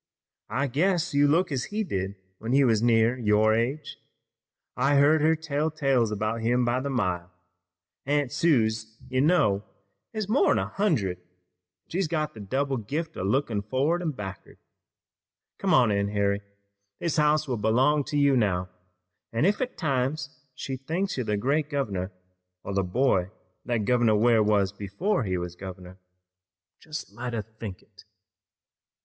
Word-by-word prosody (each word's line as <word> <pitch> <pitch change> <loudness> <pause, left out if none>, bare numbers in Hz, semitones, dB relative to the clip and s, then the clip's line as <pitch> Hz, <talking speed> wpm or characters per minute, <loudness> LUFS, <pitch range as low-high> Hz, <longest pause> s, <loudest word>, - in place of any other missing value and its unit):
I 140 - 0
guess 170 +5 +1
you 145 0 +4
look 165 +4 +2
as 130 -2 -1
he 215 +1 -2
did 95 - -3 0.2
when 115 +3 -3
he 140 +1 +5
was 115 -4 +3
near 115 +1 +3
your 110 -1 +3
age. 125 +7 -2 0.8
I've 140 +3 +2
heard 150 +2 +5
her 160 +2 +4
tell 155 -1 -1
tales 135 -7 +1
about 110 +2 -2
him 120 +2 +2
by 120 +1 +1
the 140 +2 -3
mile. 90 -8 -1 0.8
Aunt 145 -2 +1
Suse, 110 -8 +1
you 130 0 +2
know, 110 - +3 0.5
is 215 -3 -3
more'n 235 +7 +3
a 95 - 0
hundred, 110 - 0
an' 90 - -34 0.6
she's 185 0 -1
got 155 -1 -2
the 110 - -11
double 135 +7 -1
gift 155 +9 -4
o' - - -5
lookin' 105 +1 0
forrard 135 - 0
an' 170 - -1
back'ard. 95 -8 -8 1.0
Come 195 - 0
on 125 -8 +5
in, 100 0 +1
Harry, 100 0 0 0.6
this 170 -3 -2
house 150 0 +3
will 125 -3 -1
belong 130 +8 +2
to 145 +2 -2
you 140 -1 +4
now, 95 -6 +1 0.6
an' 115 +7 +1
ef 205 +5 +2
at 255 0 -3
times 135 -2 -1 0.2
she 135 0 -5
thinks 170 +9 -2
you're 125 -4 -3
the 105 -1 +1
great 140 +7 0
governor, 100 -10 -2 0.5
or 100 - -5
the 100 - +2
boy 95 -1 +1 0.4
that 120 -4 -1
Governor 120 -2 +3
Ware 115 +1 +4
was 105 -2 +2
before 105 - -1
he 95 -2 -1
was 90 0 -5
governor, 95 0 -10 0.8
jest 155 -1 -7
let 120 0 -5
her 110 -2 -2
think 110 -3 -9
it." - - -20
125 Hz, 165 wpm, -26 LUFS, 105-150 Hz, 1.0 s, he